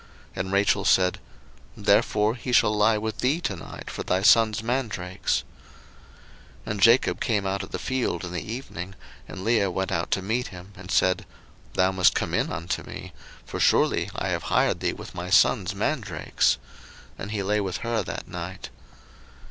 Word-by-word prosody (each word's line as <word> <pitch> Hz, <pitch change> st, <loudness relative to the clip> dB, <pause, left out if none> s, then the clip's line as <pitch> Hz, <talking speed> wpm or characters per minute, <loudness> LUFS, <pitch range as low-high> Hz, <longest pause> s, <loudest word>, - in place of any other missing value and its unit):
And 95 Hz, +1 st, -3 dB
Rachel 100 Hz, 0 st, +2 dB
said, 90 Hz, -1 st, +3 dB, 0.6 s
Therefore 105 Hz, +1 st, +3 dB
he 125 Hz, +1 st, -5 dB
shall 105 Hz, -3 st, +4 dB
lie 105 Hz, +1 st, +4 dB
with 110 Hz, +1 st, -4 dB
thee 140 Hz, +6 st, +2 dB
to 100 Hz, -, -2 dB
night 85 Hz, -, -10 dB
for -, -, -5 dB
thy 95 Hz, +1 st, 0 dB
son's 110 Hz, +1 st, +5 dB
mandrakes. 110 Hz, -7 st, -1 dB, 1.2 s
01:030:016 -, -, -3 dB
And 105 Hz, -2 st, -4 dB
Jacob 115 Hz, +4 st, +5 dB
came 105 Hz, -5 st, 0 dB
out 95 Hz, +1 st, -1 dB
of 95 Hz, -, -8 dB
the -, -, -4 dB
field 130 Hz, -7 st, -2 dB
in 90 Hz, -, -6 dB
the 90 Hz, -2 st, -3 dB
evening, 95 Hz, -7 st, -6 dB, 0.3 s
and 95 Hz, -, -8 dB
Leah 110 Hz, -3 st, +2 dB
went 95 Hz, +1 st, -2 dB
out 85 Hz, 0 st, -1 dB
to 95 Hz, -, 0 dB
meet 115 Hz, +5 st, -1 dB
him, 90 Hz, +2 st, -11 dB
and 95 Hz, 0 st, -11 dB
said, 95 Hz, +1 st, +2 dB, 0.5 s
Thou 95 Hz, +1 st, +3 dB
must 95 Hz, -1 st, +4 dB
come -, -, -1 dB
in -, -, +1 dB
unto 85 Hz, +2 st, -3 dB
me; -, -, -9 dB, 0.3 s
for -, -, -6 dB
surely -, -, +3 dB
I -, -, -2 dB
have -, -, -1 dB
hired -, -, +2 dB
thee -, -, 0 dB
with -, -, -10 dB
my 90 Hz, +1 st, -5 dB
son's 100 Hz, -1 st, +4 dB
mandrakes. 100 Hz, -, 0 dB, 0.6 s
And 100 Hz, -, -5 dB
he 105 Hz, -2 st, -2 dB
lay 105 Hz, +2 st, +1 dB
with 95 Hz, -2 st, -2 dB
her 115 Hz, -1 st, 0 dB
that -, -, -6 dB
night. 90 Hz, +1 st, -7 dB
100 Hz, 180 wpm, -25 LUFS, 95-110 Hz, 1.2 s, son's